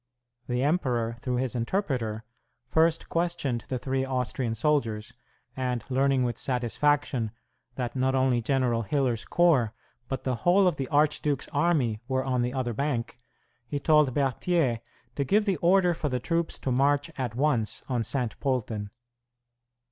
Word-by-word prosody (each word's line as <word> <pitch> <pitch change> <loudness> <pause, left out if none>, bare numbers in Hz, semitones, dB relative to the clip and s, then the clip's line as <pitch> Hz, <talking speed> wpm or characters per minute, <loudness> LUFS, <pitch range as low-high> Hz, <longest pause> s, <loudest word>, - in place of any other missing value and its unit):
The 125 +1 0
emperor, 125 -7 0
through 125 0 -2
his 125 0 -1
interpreter, 120 - -1 0.4
first 160 +5 +2
questioned 165 -9 -1
the 130 - -2
three 130 +1 -1
Austrian 125 -2 -2
soldiers, 120 -4 0 0.4
and 125 -3 -2
learning 135 0 +2
with 120 -2 -2
satisfaction 130 -1 0 0.5
that 125 -1 -3
not 130 0 +1
only 130 -2 +2
General 125 -1 +1
Hiller's 125 -1 0
corps, 140 -11 +3 0.3
but 135 0 -4
the 130 -2 -1
whole 185 - +4
of 180 - +2
the 135 - -2
archduke's 145 -1 +1
army, 140 -8 +1
were 130 0 0
on 125 -2 +1
the 120 +1 0
other 130 -2 -2
bank, 125 -2 -2 0.5
he 145 - -2
told 150 -1 +4
Berthier 135 -1 +1 0.3
to 140 - -1
give 205 +10 +2
the 195 -4 +1
order 180 +2 +4
for 155 -2 -2
the 125 -1 -1
troops 165 +5 -1
to 130 - -1
march 140 +3 +2
at 125 -4 -3
once 125 -5 0
on 125 -3 0
Saint 125 -3 -2
Polten. 115 -6 -2
130 Hz, 150 wpm, -27 LUFS, 120-150 Hz, 0.5 s, whole